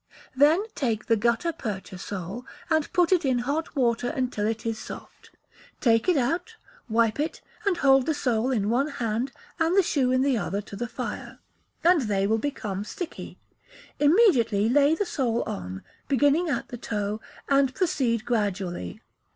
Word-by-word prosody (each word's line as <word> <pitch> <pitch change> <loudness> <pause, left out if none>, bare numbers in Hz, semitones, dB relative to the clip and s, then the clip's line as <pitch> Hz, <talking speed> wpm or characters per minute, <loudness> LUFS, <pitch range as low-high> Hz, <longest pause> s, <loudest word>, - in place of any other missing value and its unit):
Then 300 +8 +5
take 230 -7 -1
the 230 - +3
gutta 235 +9 +1
percha 200 - -6
sole, 195 +4 -5 0.3
and 315 -2 +1
put 355 -1 +3
it 360 -3 +4
in 260 -3 +2
hot 310 +4 -2
water 245 -2 +1
until 250 -7 -1
it 225 0 -3
is 225 -1 -2
soft; - - -10 0.5
take 230 +4 +3
it 355 - +4
out, 335 - -1 0.3
wipe 225 +2 +2
it, 305 +2 -2 0.3
and 375 -3 +2
hold 270 -3 +4
the 315 - +1
sole 245 -3 0
in 215 -5 0
one 265 +5 +2
hand 240 -2 -2 0.3
and 330 +3 +2
the 390 - +6
shoe 265 -6 +1
in 255 0 +3
the 270 -4 +2
other 200 0 -2
to 205 -1 -9
the 240 +4 -3
fire, 240 +1 -6 0.5
and 340 -1 +5
they 200 -4 0
will 220 +2 +2
become 215 -8 -3
sticky; 345 - -7 0.6
immediately 280 - +4
lay 285 +5 +4
the 410 - -1
sole 240 -9 0
on, 90 +1 -6 0.2
beginning 290 +5 +3
at - - -2
the 245 - -6
toe, 210 -1 -3 0.3
and 275 -2 +3
proceed 245 - 0
gradually. 195 - -2
250 Hz, 165 wpm, -26 LUFS, 220-290 Hz, 0.6 s, the